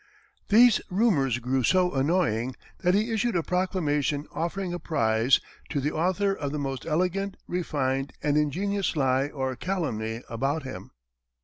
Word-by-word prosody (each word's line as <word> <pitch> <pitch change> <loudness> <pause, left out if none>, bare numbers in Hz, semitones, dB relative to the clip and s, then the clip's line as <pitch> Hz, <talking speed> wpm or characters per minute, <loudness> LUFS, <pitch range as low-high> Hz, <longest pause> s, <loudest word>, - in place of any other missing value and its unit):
These 230 +1 +6
rumors 180 - +2
grew 125 +2 0
so 180 +7 +3
annoying, 135 -5 +1 0.2
that 180 0 +2
he 215 +3 +1
issued 225 0 0
a 170 - +1
proclamation 155 -6 0
offering 175 +2 -3
a 175 - -3
prize 115 -5 +2 0.3
"To 145 - -1
the 145 +2 -1
Author 185 +5 +1
of 145 -7 -4
the 150 - -3
Most 135 -1 -4
Elegant, 185 +4 0
Refined, 140 -6 -1
and 145 -1 +2
Ingenious 185 +7 0
Lie 135 -1 +2
or 130 -3 -3
Calumny" 120 - -3
about 135 +6 -1
him. 130 - -8
150 Hz, 145 wpm, -27 LUFS, 135-185 Hz, 0.3 s, These